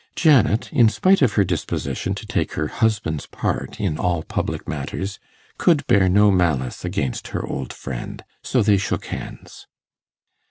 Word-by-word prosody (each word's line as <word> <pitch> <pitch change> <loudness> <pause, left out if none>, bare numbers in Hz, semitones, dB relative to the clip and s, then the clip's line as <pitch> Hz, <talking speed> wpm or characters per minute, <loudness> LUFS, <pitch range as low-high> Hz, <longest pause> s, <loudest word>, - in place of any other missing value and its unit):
Janet, 135 -7 +3
in 120 -6 +6
spite 190 - +3
of 125 -5 +3
her 100 - +4
disposition 95 - -2
to - - -8
take - - -2
her 80 - -1
husband's 105 -10 -1
part - - -3
in 75 - -1
all 85 -3 0
public - - -3
matters, 95 +2 -4 0.4
could 155 -6 +3
bear 95 -2 +4
no 105 +2 +5
malice 80 -9 0
against 65 - -2
her - - -4
old 65 -2 -5
friend; 65 -2 -7 0.2
so 125 -4 +1
they 105 -1 +4
shook 95 - -2
hands. - - -8
100 Hz, 155 wpm, -22 LUFS, 80-115 Hz, 0.4 s, in